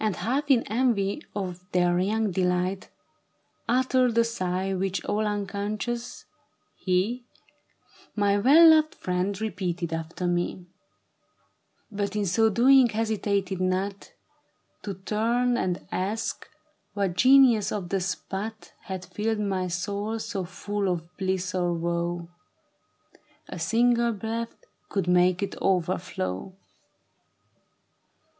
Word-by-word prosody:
i -, -, -3 dB
h 210 Hz, -, 0 dB
lf 255 Hz, +12 st, -1 dB
in 240 Hz, -, +3 dB
en\ 240 Hz, +3 st, +1 dB
y 200 Hz, +5 st, -1 dB, 0.2 s
of 185 Hz, -4 st, -3 dB, 0.2 s
their 175 Hz, -1 st, +3 dB
young 210 Hz, +2 st, 0 dB
delight, 180 Hz, +1 st, 0 dB, 0.8 s
Uttered 255 Hz, -1 st, +2 dB
a 230 Hz, -, +6 dB
sigh 190 Hz, -4 st, -2 dB
which 190 Hz, 0 st, -2 dB
all 215 Hz, +1 st, 0 dB
unconscious, 210 Hz, +3 st, -3 dB, 0.5 s
he, 205 Hz, +7 st, -1 dB, 0.9 s
;My 205 Hz, -1 st, +2 dB
well 295 Hz, +10 st, +7 dB
loved 310 Hz, -1 st, +3 dB
friend 185 Hz, +2 st, -2 dB
repeated 180 Hz, -6 st, -3 dB
after 165 Hz, +2 st, -4 dB
me; 175 Hz, +1 st, -1 dB, 1.3 s
But 200 Hz, 0 st, -3 dB
in 210 Hz, -1 st, 0 dB
so 220 Hz, +5 st, +3 dB
doing 250 Hz, +3 st, +5 dB
hesitated 205 Hz, -4 st, -1 dB
not 190 Hz, +2 st, -2 dB, 0.7 s
To 200 Hz, -2 st, -5 dB
turn 230 Hz, +6 st, 0 dB
and 185 Hz, -6 st, -2 dB
ask 210 Hz, +5 st, -3 dB, 0.5 s
what 200 Hz, -3 st, 0 dB
genius 255 Hz, -4 st, +5 dB
of 195 Hz, -4 st, -4 dB
the 195 Hz, -, 0 dB
spot 200 Hz, +4 st, -5 dB
Had 190 Hz, -1 st, -5 dB
filled 220 Hz, +1 st, -2 dB
my 190 Hz, -3 st, -1 dB
soul 205 Hz, +5 st, -3 dB
so 200 Hz, -4 st, -4 dB
full 200 Hz, +3 st, -4 dB
cf 165 Hz, +1 st, -13 dB
bliss 190 Hz, -1 st, -1 dB
or 175 Hz, -2 st, 0 dB
woe, 170 Hz, 0 st, -2 dB, 1.2 s
A -, -, -7 dB
single 235 Hz, 0 st, +2 dB
breath 225 Hz, +2 st, -4 dB, 0.3 s
could 195 Hz, -4 st, -1 dB
make 180 Hz, +1 st, +3 dB
it 200 Hz, -, -4 dB
overflow. 180 Hz, -, -1 dB
200 Hz, 120 wpm, -26 LUFS, 185-225 Hz, 1.3 s, well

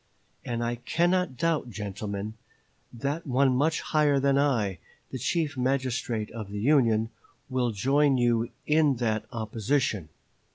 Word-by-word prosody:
And 120 Hz, -1 st, -2 dB
I 120 Hz, +1 st, -1 dB
cannot 170 Hz, +4 st, +1 dB
doubt, 160 Hz, -3 st, 0 dB
gentlemen, 100 Hz, 0 st, -5 dB, 0.6 s
that 140 Hz, +7 st, -3 dB
one 130 Hz, 0 st, +3 dB
much 155 Hz, +4 st, +1 dB
higher 150 Hz, -2 st, +2 dB
than 140 Hz, 0 st, +2 dB
I, 120 Hz, -10 st, +1 dB, 0.3 s
the 130 Hz, -, -4 dB
Chief 155 Hz, +3 st, 0 dB
Magistrate 125 Hz, -4 st, -1 dB
of 110 Hz, -3 st, -7 dB
the 105 Hz, 0 st, -5 dB
Union, 115 Hz, -3 st, +3 dB, 0.4 s
will 125 Hz, -1 st, +1 dB
join 135 Hz, +6 st, +2 dB
you 120 Hz, -1 st, +2 dB, 0.2 s
in 150 Hz, -2 st, +3 dB
that 110 Hz, -3 st, -1 dB
opposition." 110 Hz, -, -1 dB
125 Hz, 130 wpm, -27 LUFS, 110-140 Hz, 0.6 s, one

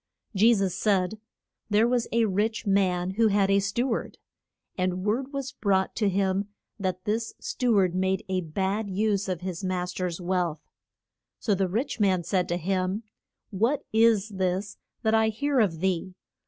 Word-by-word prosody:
Je 220 Hz, +5 st, +6 dB
sus 195 Hz, -3 st, 0 dB
said, 205 Hz, 0 st, +1 dB, 0.5 s
There 215 Hz, +2 st, +4 dB
was 245 Hz, -1 st, +1 dB
a 230 Hz, 0 st, +3 dB
rich 220 Hz, +3 st, -1 dB
man 185 Hz, -2 st, +1 dB
who 225 Hz, +3 st, +3 dB
had 200 Hz, -1 st, +2 dB
a 200 Hz, -, +5 dB
stew 235 Hz, +6 st, -1 dB
ard. 225 Hz, -, -3 dB, 0.6 s
And 185 Hz, 0 st, -1 dB
word 255 Hz, +6 st, 0 dB
was 275 Hz, -2 st, -4 dB
brought 190 Hz, -3 st, 0 dB
to 210 Hz, -3 st, +2 dB
him 195 Hz, +1 st, 0 dB, 0.3 s
that 185 Hz, -2 st, -3 dB
this 225 Hz, +2 st, -2 dB
stew 245 Hz, -4 st, 0 dB
ard 185 Hz, -3 st, +3 dB
made 190 Hz, +1 st, 0 dB
a 185 Hz, -1 st, 0 dB
bad 195 Hz, +5 st, -2 dB
use 200 Hz, 0 st, 0 dB
of 180 Hz, -2 st, -2 dB
his 185 Hz, 0 st, -5 dB
mas 180 Hz, -1 st, -2 dB
ter's 180 Hz, -2 st, -3 dB
wealth. 175 Hz, -3 st, -2 dB, 0.7 s
So 210 Hz, -, 0 dB
the 190 Hz, -1 st, 0 dB
rich 230 Hz, +7 st, -2 dB
man 190 Hz, -4 st, +2 dB
said 180 Hz, +1 st, 0 dB
to 175 Hz, -, 0 dB
him, 185 Hz, +4 st, -1 dB, 0.5 s
What 230 Hz, +9 st, +1 dB
is 220 Hz, -2 st, +4 dB
this 190 Hz, +1 st, -2 dB, 0.2 s
that 220 Hz, -1 st, +2 dB
I 220 Hz, 0 st, +4 dB
hear 275 Hz, +5 st, 0 dB
of 175 Hz, -8 st, +1 dB
thee? 185 Hz, -1 st, -1 dB
195 Hz, 170 wpm, -27 LUFS, 185-220 Hz, 0.7 s, Je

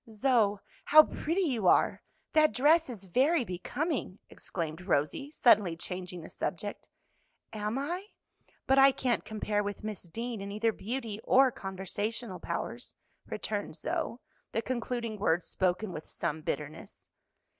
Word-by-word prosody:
"Zoe, 220 Hz, -2 st, +2 dB, 0.3 s
how 310 Hz, +1 st, +9 dB
pretty 335 Hz, +5 st, -1 dB
you 240 Hz, -, 0 dB
are! -, -, +4 dB, 0.3 s
that 310 Hz, -1 st, +5 dB
dress 310 Hz, +4 st, +4 dB
is 220 Hz, -6 st, -6 dB
very 260 Hz, -, +2 dB
becoming!" 245 Hz, -, -3 dB
exclaimed 165 Hz, -1 st, -5 dB
Rosie, 180 Hz, -, 0 dB
suddenly 210 Hz, -, +4 dB
changing 180 Hz, 0 st, -5 dB
the 160 Hz, -, -10 dB
subject. 205 Hz, +3 st, -4 dB, 0.7 s
"Am 210 Hz, +2 st, -2 dB
I? 350 Hz, +8 st, -3 dB, 0.6 s
But 270 Hz, +1 st, +4 dB
I 270 Hz, 0 st, +8 dB
can't 250 Hz, -2 st, 0 dB
compare 210 Hz, -1 st, -1 dB
with 205 Hz, 0 st, -5 dB
Miss 215 Hz, -2 st, -4 dB
Deane 230 Hz, +5 st, -5 dB
in 200 Hz, 0 st, -5 dB
either 220 Hz, +2 st, +1 dB
beauty 225 Hz, -1 st, -4 dB
or 265 Hz, 0 st, +5 dB
conversational 195 Hz, +1 st, -4 dB
powers," 235 Hz, +9 st, -4 dB, 0.3 s
returned -, -, -3 dB
Zoe, -, -, -2 dB, 0.4 s
the 225 Hz, -, 0 dB
concluding 235 Hz, -3 st, -3 dB
words 175 Hz, -3 st, +2 dB
spoken 185 Hz, +2 st, 0 dB
with 155 Hz, -, -7 dB
some 155 Hz, +1 st, -3 dB
bitterness. 150 Hz, 0 st, -5 dB
215 Hz, 135 wpm, -30 LUFS, 185-260 Hz, 0.7 s, how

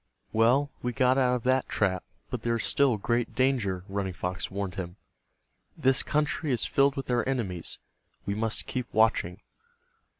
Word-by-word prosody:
"Well, 125 Hz, +6 st, +3 dB
we 125 Hz, 0 st, -2 dB
got 130 Hz, 0 st, +3 dB
out 125 Hz, -1 st, +3 dB
of 120 Hz, -, -4 dB
that 130 Hz, +1 st, +1 dB
trap, 95 Hz, -3 st, 0 dB, 0.3 s
but -, -, -3 dB
there 115 Hz, 0 st, 0 dB
is 115 Hz, -, -2 dB
still 135 Hz, -5 st, +3 dB
great 120 Hz, +3 st, -1 dB
danger," 120 Hz, -9 st, +1 dB
Running 100 Hz, -1 st, -3 dB
Fox 90 Hz, 0 st, -3 dB
warned 100 Hz, -1 st, -4 dB
him. 90 Hz, -2 st, -6 dB, 0.8 s
"This 130 Hz, +1 st, +4 dB
country 150 Hz, 0 st, 0 dB
is 120 Hz, -, +1 dB
filled 140 Hz, 0 st, +3 dB
with 135 Hz, -2 st, -4 dB
our 120 Hz, -1 st, +2 dB
enemies. 95 Hz, -10 st, -2 dB, 0.5 s
We 100 Hz, -, -1 dB
must 110 Hz, +2 st, 0 dB
keep 125 Hz, -1 st, -4 dB
watching." 110 Hz, -5 st, +2 dB
120 Hz, 165 wpm, -28 LUFS, 100-130 Hz, 0.8 s, This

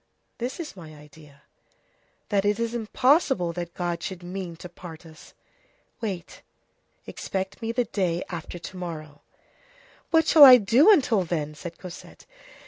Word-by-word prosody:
"This 245 Hz, +6 st, -4 dB
is 320 Hz, -9 st, -7 dB
my 160 Hz, -4 st, -11 dB
idea: 150 Hz, -1 st, -17 dB, 0.9 s
that 200 Hz, -2 st, +1 dB
it 205 Hz, +1 st, +1 dB
is 230 Hz, 0 st, -2 dB
impossible 240 Hz, -, +1 dB
that 170 Hz, 0 st, -6 dB
God 175 Hz, -1 st, -3 dB
should 180 Hz, 0 st, -6 dB
mean 180 Hz, -1 st, -6 dB
to 175 Hz, -, -10 dB
part 170 Hz, -1 st, -12 dB
us. 160 Hz, -1 st, -15 dB, 0.7 s
Wait; 195 Hz, -6 st, -6 dB, 0.6 s
expect 190 Hz, +4 st, -5 dB
me 225 Hz, 0 st, -2 dB
the 245 Hz, +1 st, 0 dB
day 180 Hz, -5 st, -1 dB
after 170 Hz, 0 st, -6 dB
to 185 Hz, +2 st, -9 dB
morrow." 155 Hz, -4 st, -7 dB, 0.9 s
"What 320 Hz, -1 st, +3 dB
shall 315 Hz, -2 st, +7 dB
I 255 Hz, -2 st, +11 dB
do 235 Hz, -, +4 dB
until 250 Hz, -, +3 dB
then?" 155 Hz, -3 st, -3 dB
said 170 Hz, +2 st, -9 dB
Cosette. 180 Hz, -2 st, -12 dB
180 Hz, 145 wpm, -25 LUFS, 170-230 Hz, 0.9 s, I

